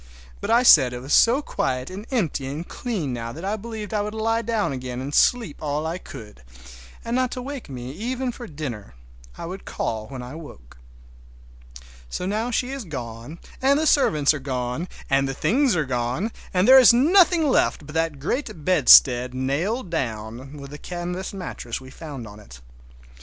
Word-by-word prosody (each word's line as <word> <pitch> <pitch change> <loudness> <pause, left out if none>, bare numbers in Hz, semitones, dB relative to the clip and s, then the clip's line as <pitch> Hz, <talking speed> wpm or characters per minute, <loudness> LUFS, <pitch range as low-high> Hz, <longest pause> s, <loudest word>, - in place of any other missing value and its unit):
But - - -5
I 235 +2 +4
said 135 - +7
it 125 - -6
was 135 - -2
so 255 +6 +5
quiet 130 - -2
and 200 +4 -8
empty 170 - -1
and 150 +6 -5
clean 190 - -3
now 115 -1 -4
that 165 +8 -8
I 205 +2 0
believed 220 -1 -7
I 210 - +1
would 210 +1 -4
lie 225 +1 0
down 225 -8 -1
again 125 -1 -5
and 135 +3 -5
sleep 230 -7 +2
all 150 +1 -2
I 165 +3 -3
could; 105 - -11 0.6
and 230 +1 -2
not 255 0 +1
to 250 - -5
wake 275 - -7
me 125 -1 -6
even 245 - -3
for 240 0 -9
dinner—I - - -9
would 185 +3 -7
call 110 -1 -4
when 130 -2 -7
I 125 +3 -8
woke. 65 - -12 1.3
So 180 - -4
now 215 +5 -1
she 250 +2 -1
is 270 -2 -5
gone, 125 - -7 0.2
and 275 +2 +4
the 315 - 0
servants 155 - +3
are 150 - -4
gone, 130 +4 -3 0.2
and 135 0 +2
the 135 - -4
things 255 - +2
are 160 -3 0
gone, 125 - -2 0.2
and 185 0 +2
there 265 +1 +10
is 250 - +8
nothing 330 +5 +4
left 255 - +1
but 150 - -10
that 160 -2 0
great 160 - -4
bedstead 125 -7 +6
nailed 170 - -2
down, 125 0 -4
with 140 -1 -10
the 150 - -9
canvas 180 +3 -5
mattress 180 - -6
we 130 0 -13
found 140 -6 -8
on 105 0 -12
it. 65 -13 -14
155 Hz, 185 wpm, -23 LUFS, -, 1.3 s, there